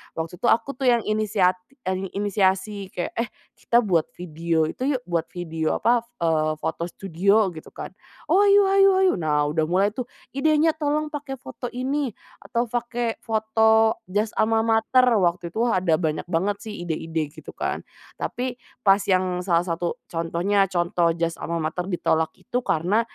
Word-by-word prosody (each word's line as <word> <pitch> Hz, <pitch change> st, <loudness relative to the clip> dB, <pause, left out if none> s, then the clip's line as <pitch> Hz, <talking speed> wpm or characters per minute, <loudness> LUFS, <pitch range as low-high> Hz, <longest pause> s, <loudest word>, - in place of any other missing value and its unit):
Waktu 165 Hz, +2 st, -5 dB
itu -, -, 0 dB
aku 270 Hz, -, +3 dB
tuh 265 Hz, -, 0 dB
yang 240 Hz, -2 st, +4 dB
inisiat 210 Hz, -4 st, +1 dB, 0.2 s
e 185 Hz, -, -1 dB, 0.2 s
inisiasi, 200 Hz, 0 st, 0 dB
kayak, 180 Hz, -2 st, -4 dB
"Eh 230 Hz, -, 0 dB, 0.3 s
kita 240 Hz, +1 st, +3 dB
buat 175 Hz, -7 st, +1 dB
video 165 Hz, -1 st, -1 dB
itu 260 Hz, -, -1 dB
yuk, 250 Hz, -, -4 dB
buat 170 Hz, -5 st, -2 dB
video 165 Hz, -3 st, -2 dB
apa, 235 Hz, 0 st, +2 dB, 0.2 s
eee, 155 Hz, -1 st, +2 dB
foto 160 Hz, +2 st, -3 dB
studio," 195 Hz, +3 st, +1 dB
gitu 155 Hz, -2 st, -11 dB
kan. -, -, -7 dB, 0.4 s
"Oh, 365 Hz, -, +5 dB
ayo 405 Hz, 0 st, +6 dB
ayo 390 Hz, 0 st, +6 dB
ayo." 375 Hz, -, +4 dB
Nah 150 Hz, -2 st, +1 dB
udah 160 Hz, 0 st, +1 dB
mulai 190 Hz, +4 st, +2 dB
tuh, 245 Hz, +3 st, -4 dB, 0.3 s
idenya, 310 Hz, +2 st, +3 dB
"Tolong 300 Hz, 0 st, 0 dB
pakai 295 Hz, -2 st, -6 dB
foto 250 Hz, -, -8 dB
ini, 260 Hz, 0 st, -1 dB, 0.2 s
atau 235 Hz, 0 st, -2 dB
pakai 240 Hz, -1 st, -2 dB
foto 220 Hz, 0 st, +3 dB
jas 205 Hz, +4 st, -1 dB
almamater," 225 Hz, +2 st, +3 dB, 0.2 s
waktu 175 Hz, -2 st, 0 dB
itu 225 Hz, +7 st, 0 dB
ada 185 Hz, -8 st, +2 dB
banyak 155 Hz, -2 st, -2 dB
banget 190 Hz, +4 st, 0 dB
sih 220 Hz, -2 st, -7 dB
ide-ide, 160 Hz, -2 st, -3 dB
gitu 155 Hz, -, -12 dB
kan. -, -, -2 dB, 0.4 s
Tapi, 250 Hz, 0 st, -2 dB, 0.3 s
pas 195 Hz, 0 st, +5 dB
yang 185 Hz, -1 st, +1 dB
salah 175 Hz, -2 st, +1 dB
satu 170 Hz, 0 st, -2 dB
contohnya, 175 Hz, +4 st, 0 dB
contoh 175 Hz, -1 st, +1 dB
jas 170 Hz, 0 st, -2 dB
almamater 170 Hz, +2 st, -3 dB
ditolak 160 Hz, -3 st, +1 dB
itu 250 Hz, 0 st, -3 dB
karena, 190 Hz, +2 st, +1 dB
195 Hz, 160 wpm, -24 LUFS, 170-235 Hz, 0.4 s, ayo